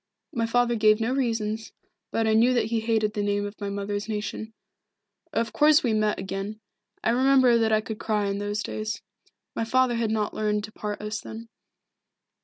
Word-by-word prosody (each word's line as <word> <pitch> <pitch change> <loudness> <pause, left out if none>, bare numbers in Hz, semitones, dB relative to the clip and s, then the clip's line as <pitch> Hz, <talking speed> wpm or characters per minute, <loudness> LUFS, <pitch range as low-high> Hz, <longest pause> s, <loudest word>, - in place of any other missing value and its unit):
My 230 -1 0
father 245 +1 +2
gave 215 -1 +4
no 225 +3 0
reasons, 225 -4 -1 0.4
but 225 - 0
I 220 - +3
knew 240 +3 +4
that 235 -3 +2
he 230 - +2
hated 220 -1 +1
the 210 - -1
name 205 0 0
of 205 +1 -8
my 200 - -2
mother's 205 +1 -3
nation. 215 +1 -4 0.8
Of 230 -5 -1
course 300 +5 +5
we 235 -4 +1
met 215 -1 +1
again. 195 +2 -5 0.4
I 225 - +3
remember 255 -1 +5
that 225 -1 +2
I 215 0 +3
could 220 0 -6
cry 210 -3 0
in 200 0 -1
those 205 +1 -2
days. 215 0 -4 0.5
My - - -1
father 255 +2 +2
had 230 -2 0
not 215 -1 -1
learned 210 -1 0
to 215 - -7
part 210 -1 -5
us 210 +1 -3
then. 230 +1 -9
220 Hz, 195 wpm, -26 LUFS, 210-230 Hz, 0.8 s, course